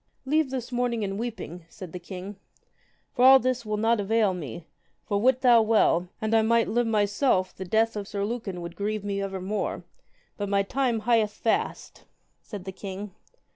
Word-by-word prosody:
Leave 305 +1 +2
this 255 -2 -5
mourning 240 -2 0
and 195 0 -3
weeping, 215 -7 -5
said 185 -3 -10
the 180 - -5
king, 185 +3 -8 0.8
for 245 - +1
all 265 +1 +10
this 255 -1 -1
will 215 0 -1
not 225 +1 +2
avail 210 -1 +2
me: 160 -2 -7 0.4
for, 200 0 0
wit 255 +2 +3
thou 240 -3 +6
well, 210 -5 +3
and 220 +1 -1
I 225 - +5
might 230 +1 +3
live 240 +1 +1
myself 205 -2 +1
the 190 - -6
death 220 +4 +1
of 205 -2 -4
Sir 200 -1 -2
Lucan 205 -5 -4
would 170 0 -7
grieve 210 +2 -2
me 200 -1 -2
evermore; 195 +1 -3 0.5
but 205 -1 -3
my 200 0 +2
time 245 +1 0
hieth 225 -1 +3
fast, 225 - -2 0.4
said 205 -4 -9
the 190 - -4
king. 195 +1 -7
215 Hz, 180 wpm, -26 LUFS, 195-235 Hz, 0.8 s, all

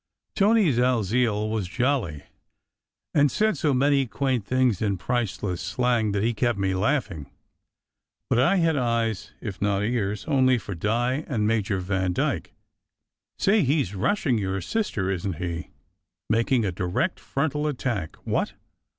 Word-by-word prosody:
Tony 205 -4 +4
Dalziel 115 -2 +1
was 110 -5 -1
jolly, 120 - -1 0.9
and 145 -1 +4
said 215 +7 +1
so 150 - +1
many 140 0 +3
quaint 130 -2 -1
things 125 -6 +2
in 100 -3 0
priceless 105 -4 -2
slang 110 +1 +1
that 100 0 0
he 120 +1 +1
kept 120 -1 0
me 95 -1 0
laughing; 95 - -1 1.0
but - - +2
I 155 +10 +4
had 165 -4 +2
eyes 115 -5 -1
if 100 -4 -6
not 100 -1 +1
ears 105 -3 -1
only 130 -3 +3
for 105 -3 -6
Di 120 - 0
and 110 -7 0
Major 105 -3 0
Vandyke. 95 -1 -1 0.9
"Say, 210 +2 +3
he 145 0 +2
s 90 - -8
rushing 125 - +1
your 95 -1 -2
sister, 95 - -1
isn 95 0 -2
t - - -10
he? 85 -1 -4 0.6
Making 115 +1 +2
a 95 - 0
direct 90 - -1
frontal 150 +1 -1
attack 120 - -2
what?" - - -1
115 Hz, 145 wpm, -25 LUFS, 100-135 Hz, 1.0 s, Tony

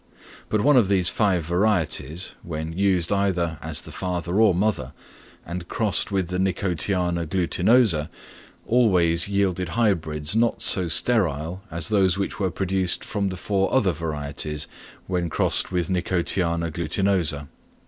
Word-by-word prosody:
But 110 - +1
one 145 +2 +4
of 115 -6 +4
these 95 -3 +3
five 95 -6 +1
varieties, 90 -2 0
when 80 0 -5
used 95 -2 +1
either 90 -5 0
as 80 -1 -1
the - - -10
father 90 +2 -2
or 105 -5 +4
mother, 105 +4 -1 0.5
and 85 +1 -6
crossed 105 -1 0
with 95 -3 -1
the 90 0 -2
Nicotiana 90 -2 0
glutinosa, 90 0 +2 0.6
always 90 -8 +3
yielded 95 -3 0
hybrids 80 -7 0
not 115 +1 +1
so 90 -2 +4
sterile 85 - 0
as 85 +5 -2
those 95 -4 +2
which 100 - -3
were 95 -2 0
produced 95 -1 -1
from 100 -2 -2
the 95 - -6
four 95 +1 -1
other 105 -8 +3
varieties 75 -1 -3 0.4
when 90 -2 -2
crossed - - 0
with 90 -3 -1
N. 90 -1 0
glutinosa. 85 -2 0
90 Hz, 140 wpm, -23 LUFS, 85-100 Hz, 0.6 s, one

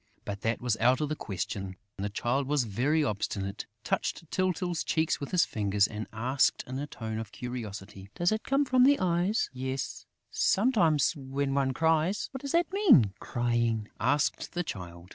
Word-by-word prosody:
But 100 -1 -5
that 115 +1 0
was 120 -3 +1
out 125 +3 +3
of 150 - -1
the 155 - -1
question. 95 -3 -4 0.2
The 100 +1 -2
Child 125 +6 -1
was 145 -2 +2
very 130 +9 +1
obstinate, 100 -4 -3 0.2
touched 165 - -2
Tyltyl's 180 -2 0
cheeks 160 0 +1
with 140 - -5
his 175 -4 +3
finger 105 -5 -3
and 110 0 -5
asked, 125 +5 +1
in 130 +1 -5
a 145 - -4
tone 110 -4 -5
of 110 -3 -6
curiosity: 105 -5 -7
"Does 175 +2 +2
it 215 0 0
come 275 +1 +2
from 255 -1 +4
the 280 +2 +5
eyes?..." 180 +3 +1
"Yes, 130 +1 -4 0.2
sometimes, 175 - +3
when 135 0 -2
one 135 -1 +2
cries." 160 +6 +1
"What 265 - -7
does 280 - -4
that 345 +2 +2
mean, 240 - +5
crying?" 120 -3 0
asked 145 +2 0
the 175 - -1
Child. 90 - -8
135 Hz, 175 wpm, -29 LUFS, 110-170 Hz, 0.2 s, the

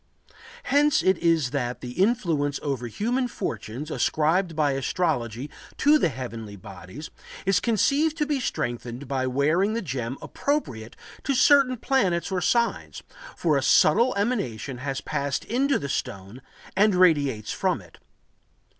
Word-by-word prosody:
Hence 290 +1 +3
it 185 -2 +3
is 165 -6 +2
that 125 -3 -3
the 125 - -6
influence 170 - 0
over 135 -4 -2
human 240 - -1
fortunes 125 - -5
ascribed 165 +3 +1
by 150 -2 +2
astrology 135 -3 -1 0.3
to 300 +2 +4
the 175 - +2
heavenly 115 -6 -7
bodies 95 - -10 0.3
is 195 0 +3
conceived 280 - +1
to 300 - +1
be 295 -2 -1
strengthened 120 - -4
by 130 -1 -1
wearing 155 +11 +1
the 230 - -1
gem 130 -4 -4
appropriate 120 - -3 0.3
to 275 - 0
certain 275 -1 +5
planets 195 -10 0
or 185 -1 -1
signs, 235 +4 0 0.3
for 155 -4 +2
a - - +1
subtle 215 - +4
emanation 140 - -2
has 135 0 -3
passed 140 -3 -2
into 270 +4 +1
the 140 - -5
stone 100 -1 -5 0.3
and 205 0 +4
radiates 145 - +2
from - - 0
it. - - -17
155 Hz, 140 wpm, -25 LUFS, -, 0.3 s, certain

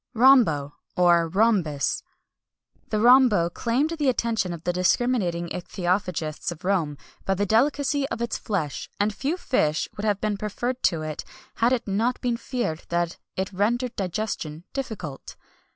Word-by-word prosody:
RHOMBO, 220 - +5 0.2
OR, 170 -2 +4
RHOMBUS. 185 - +1 0.9
The 215 - 0
rhombo 235 -7 +5
claimed 255 - 0
the 300 -5 +1
attention 230 -6 0
of 170 -2 -7
the 175 - 0
discriminating 180 -2 +1
ichthyophagists 175 -3 -2
of 170 +1 -9
Rome 165 -7 0 0.3
by 195 - 0
the 205 +2 0
delicacy 275 +5 +2
of - - -4
its 235 0 -2
flesh, 165 -10 -3
and 205 +1 +1
few 280 - -2
fish 155 - 0
would 205 - -6
have 205 -2 +1
been 210 -1 -1
preferred 240 +5 -3
to 165 -3 +1
it 155 -1 -5 0.3
had 235 +2 +3
it 255 -4 0
not 225 +6 0
been 245 -2 0
feared 235 -12 -3
that 170 0 -1 0.2
it 190 +1 -3
rendered 235 +6 0
digestion 180 -5 -3
difficult. 200 - -6
205 Hz, 150 wpm, -25 LUFS, 170-240 Hz, 0.9 s, RHOMBO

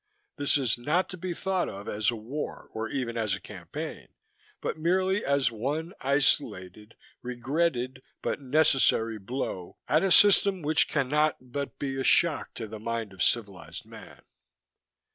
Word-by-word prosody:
This 145 0 +2
is 125 -3 +1
not 155 +9 +1
to 185 - -7
be 180 +1 -4
thought 190 0 -1
of 100 +1 -8
as 105 +1 +1
a 120 - -1
war 125 +7 -6
or 110 0 -3
even 120 -4 -3
as 105 -4 0
a - - -8
campaign, - - -8 0.5
but - - -3
merely 185 +5 +1
as 140 -4 +2
one 145 - -3
isolated, 110 -7 +1 0.3
regretted 130 +1 -1 0.2
but - - -2
necessary 130 -5 +3
blow 95 -4 -5
at 155 - +3
a 195 - +1
system 200 -3 +6
which 150 +1 +3
cannot 150 +1 +1
but 130 +3 -6
be 135 -1 -3
a - - -1
shock 165 +2 +3
to 115 - -5
the 110 0 -8
mind 115 -2 -4
of 95 - -9
civilized 100 -6 -1
man. - - -13
135 Hz, 155 wpm, -28 LUFS, 115-155 Hz, 0.5 s, system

